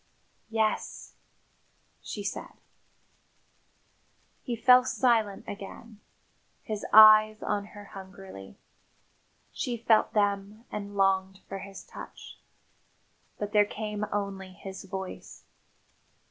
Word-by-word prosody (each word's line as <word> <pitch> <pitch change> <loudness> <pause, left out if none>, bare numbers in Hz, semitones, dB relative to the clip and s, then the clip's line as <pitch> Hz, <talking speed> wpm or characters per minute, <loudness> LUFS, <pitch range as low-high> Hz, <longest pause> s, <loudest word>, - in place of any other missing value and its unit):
"Yes," 220 -1 -1 0.9
she 205 - -6
said. 200 - -5 1.9
He 240 - -3
fell 250 +2 +6
silent 230 -6 +1
again, 205 +2 -9 0.6
his 215 -1 -4
eyes 215 0 +8
on 205 -1 -1
her 205 - -9
hungrily. 190 - -11 0.9
She 245 -2 -3
felt 225 -1 +3
them 205 +2 0
and 205 -1 -6
longed 195 0 +1
for 195 - -5
his 195 0 -9
touch. - - -11 1.0
But 205 0 -4
there 210 -1 +6
came 210 0 -4
only 195 -2 -3
his 190 0 -9
voice. 190 -1 -7
205 Hz, 95 wpm, -28 LUFS, 195-215 Hz, 1.9 s, eyes